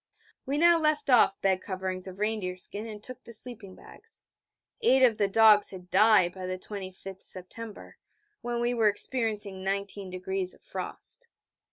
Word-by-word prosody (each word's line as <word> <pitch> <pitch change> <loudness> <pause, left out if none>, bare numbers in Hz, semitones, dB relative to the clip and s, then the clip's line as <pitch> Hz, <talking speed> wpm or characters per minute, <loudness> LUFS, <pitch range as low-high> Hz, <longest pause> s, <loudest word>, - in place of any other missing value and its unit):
We 280 +2 -1
now 340 +1 +5
left 305 -3 +1
off 225 -5 +5
bed 190 -1 +1
coverings 185 -1 -4
of 185 0 -9
reindeer 210 -3 -2
skin 205 +4 -2
and 210 -1 -9
took 255 -1 -9
to - - -10
sleeping 215 -4 -6
bags. 455 +1 -14 0.6
Eight 265 - +4
of 235 -3 +4
the 205 - +3
dogs 210 0 +5
had 180 -2 -11
died 195 -3 +5
by 185 -1 -7
the 185 0 -3
25th 190 -1 -8
September, 205 +4 -5 0.4
when 240 0 -3
we 240 +1 +1
were 225 -3 +2
experiencing 205 -3 +1
19° 190 -1 -3
of - - -25
frost. - - -6
205 Hz, 160 wpm, -28 LUFS, 190-235 Hz, 0.6 s, now